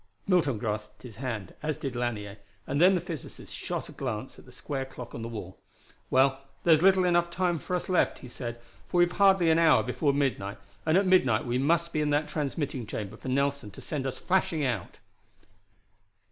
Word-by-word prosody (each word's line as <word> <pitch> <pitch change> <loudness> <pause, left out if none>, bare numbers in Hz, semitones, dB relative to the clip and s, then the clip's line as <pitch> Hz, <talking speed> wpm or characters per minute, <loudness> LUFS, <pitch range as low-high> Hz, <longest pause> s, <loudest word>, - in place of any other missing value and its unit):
Milton 170 - +2
grasped 105 -1 -4
his 120 -4 -10
hand, 110 -7 -4
as 150 0 -2
did 135 -3 -4
Lanier, 105 -4 -3 0.3
and 140 +3 -1
then 185 +2 +7
the 175 - 0
physicist 160 -6 -8
shot - - -4
a - - -10
glance - - -5
at - - -16
the - - -15
square 135 -2 -4
clock 125 -2 -9
on 115 - -6
the 115 - -4
wall. 105 -6 -7 0.5
"Well, 135 +1 +3 0.2
there's 160 -2 +5
little 190 0 +5
enough 175 -1 +3
time 175 -2 0
left 180 -1 -1
us," 180 - +2
he 125 - -10
said, 120 -1 -6 0.3
"for - - -1
we've 175 0 +5
hardly 190 -4 +4
an 160 - +4
hour 165 -2 +5
before 145 -3 +1
midnight, 135 -8 -1 0.3
and 160 +3 +5
at 195 - +3
midnight 135 -12 +4
we 120 +1 0
must 170 +4 +1
be 155 - +1
in 150 - +1
that 150 +1 +1
transmitting 140 -5 -3
chamber 105 0 -5
for 125 - -10
Nelson 140 -3 0
to 100 - -13
send 140 -4 -3
us 130 - -3
flashing 180 -5 +1
out!" 125 -3 -3
140 Hz, 200 wpm, -28 LUFS, 120-170 Hz, 0.5 s, then